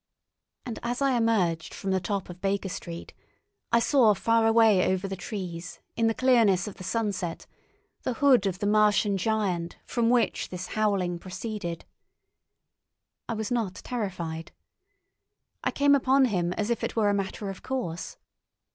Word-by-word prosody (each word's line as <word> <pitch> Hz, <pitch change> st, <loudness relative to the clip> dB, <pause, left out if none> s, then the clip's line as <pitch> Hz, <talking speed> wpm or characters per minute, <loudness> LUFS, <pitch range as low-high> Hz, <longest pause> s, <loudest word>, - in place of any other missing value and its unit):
And 240 Hz, -3 st, -5 dB
as 240 Hz, +1 st, -2 dB
I 275 Hz, -2 st, +2 dB
emerged 200 Hz, -9 st, +1 dB
from 195 Hz, -, -3 dB
the 190 Hz, -, +2 dB
top 195 Hz, +2 st, -3 dB
of 180 Hz, 0 st, -10 dB
Baker 195 Hz, 0 st, -1 dB
Street, 170 Hz, -1 st, -7 dB, 0.6 s
I 235 Hz, -, +5 dB
saw 230 Hz, -3 st, +4 dB
far 230 Hz, +2 st, +2 dB
away 225 Hz, -5 st, +5 dB
over 190 Hz, +1 st, -1 dB
the 195 Hz, -, -4 dB
trees 180 Hz, -4 st, -6 dB, 0.2 s
in 230 Hz, -, +2 dB
the 225 Hz, -, +1 dB
clearness 230 Hz, -8 st, +4 dB
of 210 Hz, -, -8 dB
the -, -, -9 dB
sunset 190 Hz, -4 st, -2 dB, 0.6 s
the 255 Hz, -, -2 dB
hood 255 Hz, -6 st, +4 dB
of 185 Hz, -2 st, -2 dB
the 205 Hz, -, -3 dB
Martian 210 Hz, -1 st, +3 dB
giant 190 Hz, -4 st, -1 dB
from 235 Hz, -2 st, +1 dB
which 245 Hz, -1 st, +1 dB
this 180 Hz, 0 st, -6 dB
howling 195 Hz, -5 st, 0 dB
proceeded. 185 Hz, -2 st, -5 dB, 1.4 s
I 230 Hz, -, -1 dB
was 220 Hz, +2 st, -4 dB
not 225 Hz, -6 st, -1 dB
terrified. 175 Hz, -9 st, -4 dB, 1.1 s
I -, -, +2 dB
came 285 Hz, 0 st, +3 dB
upon 270 Hz, 0 st, +4 dB
him 180 Hz, -7 st, 0 dB
as 210 Hz, +4 st, -2 dB
if 235 Hz, -, -1 dB
it -, -, -2 dB
were 215 Hz, -3 st, +3 dB
a -, -, +2 dB
matter 195 Hz, 0 st, -3 dB
of 190 Hz, -, -11 dB
course. 235 Hz, -11 st, -4 dB
205 Hz, 160 wpm, -27 LUFS, 185-230 Hz, 1.4 s, I